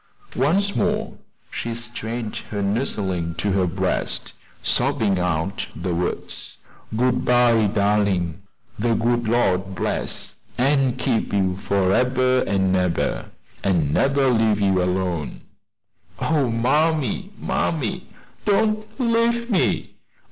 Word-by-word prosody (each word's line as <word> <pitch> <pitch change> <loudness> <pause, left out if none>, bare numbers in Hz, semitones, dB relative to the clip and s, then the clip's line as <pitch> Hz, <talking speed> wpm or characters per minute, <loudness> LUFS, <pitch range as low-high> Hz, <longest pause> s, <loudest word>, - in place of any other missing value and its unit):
Once 195 +10 +2
more - - -1 0.3
she 115 0 -4
strained 115 -1 -5
her 100 -2 -2
nursling 95 -6 -1
to 100 +4 -1
her 95 -1 +2
breast, 95 +2 -2 0.3
sobbing 120 -8 +1
out 90 +2 -1
the 85 +2 -2
words: 90 +1 -4 0.4
"Good 125 +1 +2
by, 120 -3 +4
darlin'! 100 -4 +1 0.4
de 115 +1 +2
good 120 0 +1
Lord 95 -5 +1
bless - - -3 0.2
an' 135 -1 +2
keep 125 -3 0
you 95 -2 +1
forebber 125 +7 +2
an' 95 -1 +2
ebber, 90 -2 0 0.3
an' 85 -7 +1
nebber 135 - +3
leave 110 -3 +2
you 95 -2 +2
alone." 90 -3 -2 0.8
"Oh, 150 -5 +1
mammy, 150 - +1
mammy, 145 -10 -1 0.4
don't 215 +1 +1
leave 235 0 +1
me!" 195 - 0
110 Hz, 110 wpm, -22 LUFS, 95-130 Hz, 0.8 s, by